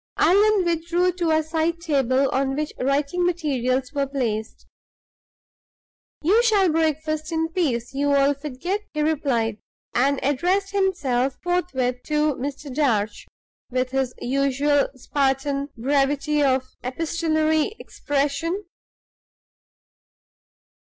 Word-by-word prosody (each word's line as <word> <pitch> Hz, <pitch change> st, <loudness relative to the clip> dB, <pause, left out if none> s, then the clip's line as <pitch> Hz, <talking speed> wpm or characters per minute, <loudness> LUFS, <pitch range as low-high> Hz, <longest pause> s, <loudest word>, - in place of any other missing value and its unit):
Allan 400 Hz, +3 st, +4 dB
withdrew 340 Hz, +2 st, +1 dB
to 350 Hz, -2 st, -1 dB
a 315 Hz, 0 st, +3 dB
side 320 Hz, +2 st, -1 dB
table 275 Hz, -5 st, +1 dB
on 270 Hz, 0 st, 0 dB
which 300 Hz, +1 st, -3 dB
writing 280 Hz, +6 st, 0 dB
materials 270 Hz, -7 st, 0 dB
were 280 Hz, -1 st, 0 dB
placed. 225 Hz, -6 st, -3 dB, 1.6 s
"You 405 Hz, +9 st, +4 dB
shall 410 Hz, -7 st, +3 dB
breakfast 310 Hz, 0 st, -1 dB
in 325 Hz, 0 st, 0 dB
peace, 275 Hz, -10 st, -1 dB
you 285 Hz, +1 st, +1 dB
old 280 Hz, 0 st, +2 dB
fidget," 310 Hz, +8 st, -3 dB
he 305 Hz, -, 0 dB
replied, 245 Hz, -8 st, 0 dB, 0.3 s
and 275 Hz, +2 st, +2 dB
addressed 355 Hz, +9 st, +1 dB
himself 285 Hz, -10 st, 0 dB
forthwith 270 Hz, -9 st, -1 dB
to 300 Hz, 0 st, +1 dB
Mr. 280 Hz, +1 st, -6 dB
Darch, 230 Hz, -7 st, 0 dB, 0.4 s
with 255 Hz, 0 st, -1 dB
his 265 Hz, -2 st, -1 dB
usual 275 Hz, +2 st, +1 dB
Spartan 275 Hz, +1 st, -1 dB
brevity 285 Hz, +3 st, +1 dB
of 260 Hz, -2 st, +2 dB, 0.2 s
epistolary 315 Hz, -, 0 dB
expression. 290 Hz, +7 st, -2 dB
290 Hz, 105 wpm, -23 LUFS, 265-330 Hz, 1.6 s, Allan